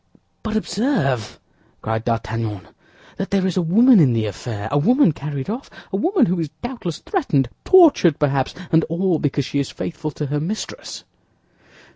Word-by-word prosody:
"But 220 -1 -4
observe," 175 - -1 0.4
cried 110 +1 -2
D'Artagnan, 115 -4 -3 0.5
"that 195 - -3
there 195 -1 +1
is 185 - -1
a 185 - +2
woman 225 +8 +5
in 135 -7 +4
the 110 -1 0
affair—a 110 +5 -3
woman 245 - +4
carried 140 -2 -5
off, 235 +6 -5 0.2
a - - +1
woman 340 - +2
who 180 -3 -1
is 160 -3 -2
doubtless 240 - -4
threatened, 155 - 0 0.2
tortured 305 - +6
perhaps, 140 -3 0 0.2
and 160 0 +4
all 170 0 0
because 140 -1 -1
she 140 - -2
is 140 - -2
faithful 160 -2 -5
to 150 +1 -5
her 145 +1 -2
mistress." 190 +9 -5
160 Hz, 160 wpm, -21 LUFS, 135-210 Hz, 0.5 s, tortured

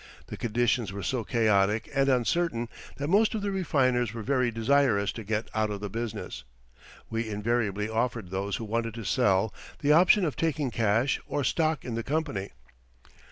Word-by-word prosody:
The - - -7
conditions 120 -1 0
were 100 0 -6
so 130 -4 -1
chaotic 105 -2 +2
and 135 0 +2
uncertain 125 -1 +1 0.3
that 145 +1 -3
most 210 +6 +3
of 210 - -3
the 200 - -1
refiners 130 - +1
were 115 - -5
very 125 0 +1
desirous 115 -3 +2
to 115 - -7
get 110 +2 -2
out 110 -1 +1
of 105 -1 -4
the 100 -1 -5
business. 110 - -5 0.7
We 115 0 -2
invariably 105 -1 -1
offered 115 -3 -2
those 100 +1 -2
who 115 - -5
wanted 115 +1 -2
to 115 - -6
sell 105 -4 +2 0.2
the 145 - +1
option 180 +4 +6
of 150 - -2
taking 155 -5 -1
cash 115 +4 +1
or 145 - -1
stock 155 +3 0
in 125 - -4
the 115 - -1
company. 140 -8 -2
115 Hz, 175 wpm, -28 LUFS, 105-140 Hz, 0.7 s, option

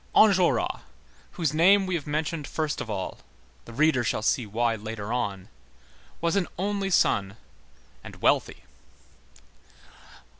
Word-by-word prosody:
Enjolras, 190 -5 +4 0.5
whose 160 -6 -1
name 190 +5 +5
we 185 - -3
have 155 -4 -3
mentioned 155 0 -2
first 155 -2 -2
of - - -6
all,—the 65 - -8
reader 145 -1 +2
shall 110 -1 -1
see 115 0 +1
why 115 +3 0
later 110 0 -5
on,—was 95 - -6
an 195 -3 +1
only 200 +1 -1
son 100 - +2 0.7
and - - -10
wealthy. - - +1
140 Hz, 115 wpm, -26 LUFS, 105-170 Hz, 0.7 s, name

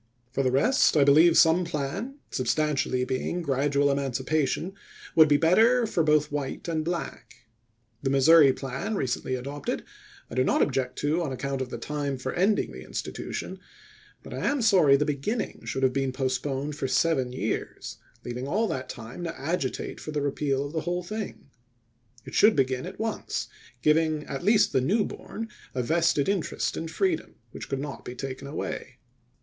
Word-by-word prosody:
For 135 - 0
the 130 - +2
rest, 155 - +3
I 145 - +6
believe 155 +4 +6
some 165 +3 +5
plan, 170 - -4 0.2
substantially 130 -1 0
being 135 +7 -2
gradual 140 0 +2
emancipation, 140 +6 -1 0.4
would 160 -1 +8
be 145 -1 +4
better 225 +10 +4
for 180 - 0
both 150 -1 +3
white 145 +1 -4
and 160 -2 -1
black. 170 -6 -5 0.6
The 135 - 0
Missouri 140 +2 +7
plan, 135 +11 -4
recently 130 -4 -1
adopted, 140 +3 -4 0.4
I - - -11
do 130 +1 +2
not - - +3
object 125 -1 -1
to 150 +4 +1
on 155 -5 -2
account 135 +1 -3
of 130 - -3
the - - -5
time 145 -2 -3
for 130 +1 -4
ending 200 +4 +1
the - - -9
institution; - - -5 0.6
but - - -9
I - - -4
am 280 -3 +1
sorry 180 -10 +6
the 150 - +1
beginning 150 - -3
should 135 - -3
have 130 -1 +3
been 135 0 0
postpoued 135 +2 -2
for 140 -2 -3
seven 130 -3 +1
years, 110 -4 -4 0.3
leaving 125 +2 -4
all 215 +9 +1
that 130 -1 -4
time 120 +7 -8
to 170 - -5
agitate 140 -2 -3
for - - -8
the 150 -2 -2
repeal 140 -1 0
of 145 - -7
the 160 - -1
whole 175 +2 -2
thing. 205 -7 -6 0.7
It - - -10
should 215 +1 +5
be 135 - +4
gin 130 +4 -4
at 190 - -9
once, 220 0 -3 0.3
giving 155 0 +3
at 140 +1 -6
least 210 +1 +4
the 130 - +3
new 205 - +2
born 225 0 -7 0.3
a 125 - 0
vested 160 0 +2
interest 195 -4 -1
in 165 - -4
freedom, 350 - -1 0.2
which - - -8
could 135 - -1
not 145 0 -6
be 125 - -7
taken 135 +1 -6
away. 135 -3 -5
145 Hz, 175 wpm, -27 LUFS, 135-170 Hz, 0.7 s, would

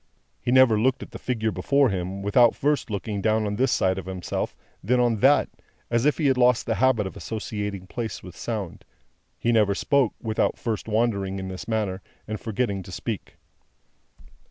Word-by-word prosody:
He 120 - -1
never 130 -4 +6
looked 130 +3 +1
at - - -12
the - - -8
figure 110 -3 -1
before 140 +2 +2
him, 95 0 -3
without 115 +4 +4
first 145 -3 0
looking 100 0 -3
down 110 +1 +2
on 105 0 -2
this 130 +3 +2
side 95 0 +1
of 95 - -9
himself, 95 -2 -3 0.3
then 125 +6 +2
on 120 -2 +2
that, 135 +7 +4 0.4
as 120 +2 +2
if 150 - +3
he 155 - -1
had 135 -2 +3
lost 125 -2 +4
the 115 - 0
habit 130 -5 +3
of 95 - -6
associating 105 -3 -4
place 110 +2 -5
with 90 -2 -10
sound; 105 -4 -5 0.5
he 120 - +1
never 105 -3 +3
spoke, 140 +1 +2
without 110 -1 0
first 115 -2 -3
wandering 105 -4 0
in 95 -1 -5
this 95 +1 -7
manner, 105 -4 -1 0.3
and 110 -1 -4
forgetting 105 -3 -2
to - - -11
speak. - - -5
110 Hz, 185 wpm, -25 LUFS, 100-125 Hz, 0.5 s, never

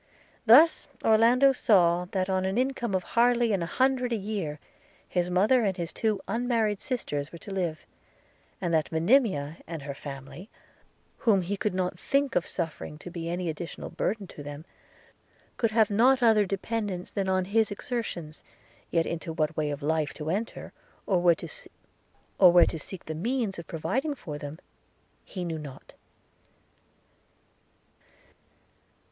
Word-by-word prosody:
Thus 300 +9 +7 0.2
Orlando 235 +5 +5
saw, 180 -8 +3
that 185 0 -2
on 190 -1 0
an 190 +3 -1
income 250 -5 0
of 185 - 0
hardly 240 0 +2
an 190 - 0
hundred 255 +7 +1
a - - +2
year, 195 -8 -4 0.5
his 180 -1 -1
mother 210 +8 +4
and 195 -3 0
his 170 -2 -3
two 215 -3 0
unmarried 225 -2 0
sisters 150 - -3
were 170 - -9
to 200 - -10
live; 170 -5 -2 0.7
and 175 -3 -2
that 160 -1 +1
Monimia 165 - +2
and 165 -3 -6
her 140 -1 -5
family, 140 +7 -9 0.7
whom 200 -5 +3
he 195 +4 -2
could 210 -1 -2
not 180 -2 -2
think 280 0 0
of 180 - +1
suffering 160 -3 -4
to 175 - -10
be 170 -1 -5
any 175 +1 -2
additional 165 +2 -5
burden 210 -1 -2
to 155 - -11
them, 145 +2 -8 0.9
could 230 - +1
have 220 -1 +3
not 250 +5 +4
other 215 -3 +5
dependence 200 -2 -3
than 195 -1 -1
on 185 -1 +1
his 220 +3 +2
exertions; 200 -8 -5 0.5
yet 165 -1 +1
into 170 0 -4
what 155 -1 -1
way 150 -1 -1
of 145 0 -5
life 155 0 0
to 155 +1 -3
enter, 215 +6 -4 0.3
or 185 -3 +2
where 175 -1 +5
to 180 - +1
seek 185 +4 -9
the 160 - -4
means 215 +3 -2
of 170 - -9
providing 265 - -2
for 150 - -7
them, 145 +1 -7 0.7
he 185 -2 -6
knew 165 -2 -3
not. 140 -3 -11
185 Hz, 150 wpm, -27 LUFS, 165-225 Hz, 0.9 s, Thus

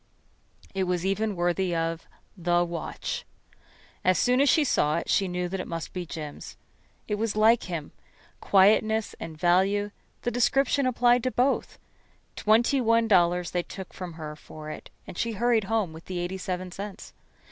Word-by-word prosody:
It 190 -1 0
was 180 0 -1
even 205 +2 0
worthy 175 +1 0
of 165 0 -2 0.3
The 175 -1 +2
Watch. 170 -1 -4 0.8
As 185 0 +3
soon 250 +2 +3
as 280 - +4
she 315 - +5
saw 155 - +2
it - - -3
she 195 - +3
knew 180 0 -2
that 190 +2 -4
it - - -4
must 165 -1 -5
be 180 -2 -4
Jim's. 150 -1 -7 0.5
It 210 -1 -2
was 225 -1 -1
like 220 +2 +4
him. 165 -4 -4 0.5
Quietness 215 +2 +3
and 160 -1 -7
value 195 +5 +2 0.3
the 240 - 0
description 255 +3 +2
applied 245 0 +3
to - - +3
both. 255 +2 0 0.6
Twenty 235 +5 +3
one 230 -1 +3
dollars 180 -3 +3
they 175 - 0
took 190 +1 -9
from 180 -2 -7
her 155 -2 -7
for 155 0 -9
it, - - -9 0.2
and - - -8
she 230 -1 0
hurried 230 0 +2
home 210 -5 0
with 160 +1 -11
the 185 - -5
eighty 175 +2 -3
seven 185 0 -4
cents. 200 +2 -8
190 Hz, 170 wpm, -27 LUFS, 175-225 Hz, 0.8 s, she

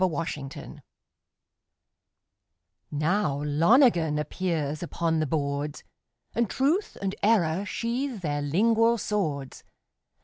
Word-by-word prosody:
AN - - +5
INTERPRETATION 145 -4 -5 2.1
Now 150 -1 0
Lonergan 165 - +4
appears 155 -1 -2
upon 165 -1 -1
the 155 - 0
boards, 145 0 -2 0.5
And 235 -3 0
Truth 315 +10 0
and 195 -1 -1
Error 195 -4 +2
sheathe 235 0 -2
their 145 -3 -1
lingual 225 +10 +3
swords. 155 - -3
165 Hz, 95 wpm, -27 LUFS, 150-220 Hz, 2.1 s, AN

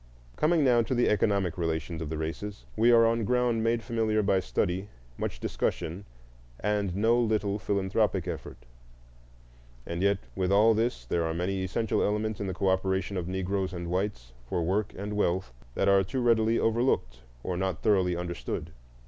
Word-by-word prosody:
Coming 160 0 +3
now 125 -3 +5
to 125 +3 -1
the 120 - +3
economic 100 -5 +1
relations 80 0 -2
of 80 - -4
the 80 - -3
races, 85 +6 -5
we 115 +2 +4
are 115 -1 +6
on 115 0 +2
ground 120 0 +1
made 115 0 +1
familiar 110 -3 0
by 95 -1 +3
study, 90 +7 -1 0.3
much - - -4
discussion, 90 +5 -2 0.5
and 105 -3 -1
no 115 +4 +3
little 105 -3 0
philanthropic 100 -2 0
effort. 80 -7 -7 1.2
And 85 +1 -4
yet 100 0 +3 0.2
with 95 0 0
all 105 +3 +6
this 110 - -1
there 85 +7 0
are 80 0 -2
many 95 +2 -1
essential 110 +3 0
elements 105 0 -1
in 100 - -2
the 95 - -3
cooperation 95 0 0
of 90 -2 -3
Negroes 95 0 -2
and 85 -1 -5
whites 90 -11 -2 0.2
for 85 - 0
work 100 +5 0
and 105 +2 -4
wealth 95 -9 0 0.2
that - - +1
are 100 -1 +5
too 130 +8 -3
readily 115 -1 +3
overlooked 115 - +1 0.2
or 90 - -2
not 95 -2 -2
thoroughly 95 -5 +3
understood. 85 -2 -4
100 Hz, 170 wpm, -28 LUFS, 90-110 Hz, 1.2 s, are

